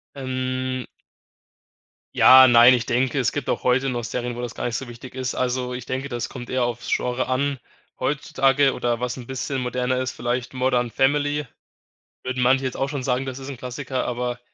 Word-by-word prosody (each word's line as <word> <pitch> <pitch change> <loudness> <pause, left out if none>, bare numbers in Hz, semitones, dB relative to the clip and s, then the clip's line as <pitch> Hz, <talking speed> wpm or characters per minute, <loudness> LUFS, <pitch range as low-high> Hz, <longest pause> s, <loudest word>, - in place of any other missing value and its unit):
Ähm 130 -1 -3 1.3
Ja, 130 0 +9
nein, 120 +1 +8
ich 120 -2 +1
denke, 130 +3 +1
es 120 - +1
gibt 145 - -3
auch - - -2
heute 130 +2 +2
noch 120 -1 -3
Serien, 120 +2 -3
wo 120 - -6
das 120 -1 -5
gar - - -5
nicht 120 - -1
so 135 - -6
wichtig 120 +2 -11
ist. 130 -1 -3
Also, 125 0 -1
ich 125 -1 -6
denke, 130 +2 -4
das 120 -3 -4
kommt 120 -2 -8
eher 130 -1 0
aufs 120 -1 -4
Genre 125 +1 0
an. 140 +1 0 0.4
Heutzutage 135 0 +2
oder 120 -1 -1
was 125 0 -2
'n 120 - -9
bisschen 130 +1 -3
moderner 125 +1 -1
ist, 130 -1 -2
vielleicht 120 +2 -3
„Modern 125 -2 +1
Family“ 145 +2 +1 0.8
würden 130 0 -2
manche 130 +1 +3
jetzt 130 - -3
auch 135 - -1
schon 140 -2 -3
sagen, 125 +1 0
das 130 0 -6
ist 135 - -8
'n 135 - -5
Klassiker, 125 +1 -4
aber 125 0 -3
130 Hz, 200 wpm, -23 LUFS, 125-130 Hz, 1.3 s, Ja